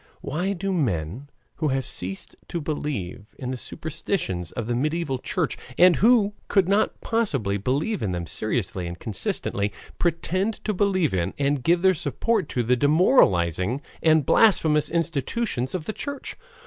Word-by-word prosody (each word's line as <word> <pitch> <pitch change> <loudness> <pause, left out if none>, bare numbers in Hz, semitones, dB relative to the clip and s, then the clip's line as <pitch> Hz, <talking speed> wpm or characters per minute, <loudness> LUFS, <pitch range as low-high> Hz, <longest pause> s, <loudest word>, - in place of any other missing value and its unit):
Why 180 +8 -1
do 195 +1 -2
men 120 - -2 0.3
who 155 - 0
have 135 -2 0
ceased 95 +2 -5
to 170 - -3
believe 145 - -4
in 130 -1 -4
the - - -2
superstitions 140 - -3
of 120 - -4
the 120 - -1
mediaeval 150 +1 -1
Church, - - -2 0.2
and 180 -1 +6
who 215 -2 +4
could 195 -3 +3
not 200 +2 +1
possibly 135 - 0
believe 145 - -1
in 105 - -1
them 90 -1 -3
seriously 95 -2 -2
and 85 0 -6
consistently, 100 0 -2 0.3
pretend 185 +5 0
to 215 - -1
believe 185 - +1
in 90 -2 -1
and 140 -1 +1
give 170 +6 +2
their 190 0 +6
support 180 - -1
to 120 - -1
the 125 +2 +3
demoralizing 120 - +3 0.2
and 155 -3 +4
blasphemous 155 -9 +4
institution 165 - -1
of 165 -4 -4
the 215 - -3
church? 285 +3 -6
150 Hz, 155 wpm, -24 LUFS, 115-185 Hz, 0.3 s, and